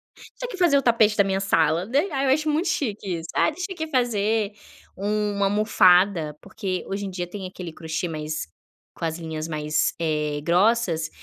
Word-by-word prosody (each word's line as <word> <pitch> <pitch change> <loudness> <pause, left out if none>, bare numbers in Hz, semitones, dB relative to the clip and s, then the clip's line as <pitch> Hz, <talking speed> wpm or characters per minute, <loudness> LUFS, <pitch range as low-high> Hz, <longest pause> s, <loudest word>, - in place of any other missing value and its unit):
"Deixo - - -16
eu - - 0
aqui, 480 - -7
fazer 345 -6 +4
o - - +3
tapete 225 -3 +3
da 200 - +6
minha 195 0 0
sala", 175 -1 +2
daí, 290 +9 +1
ai, 275 -1 0
eu 265 - +6
acho 305 +1 0
muito 320 +5 +1
chique 210 - -2
isso: 165 - -8
"Ah - - +3
deixa 355 +4 -5
eu 320 -3 -4
fazer 220 -5 +1 0.4
uma 205 0 0
almofada", 185 -6 +3
porque 190 -2 -4
hoje 200 +1 -3
em - - -4
dia 180 -1 -4
tem 190 0 -6
aquele 180 -3 -8
crochê, 160 +1 -3
mais, 155 - -4 0.5
com 165 - -5
as 160 +1 -2
linhas, 160 -1 -5
eh, - - -11
mais 155 0 0 0.5
grossas, 175 -2 +2
200 Hz, 190 wpm, -24 LUFS, 170-235 Hz, 0.5 s, da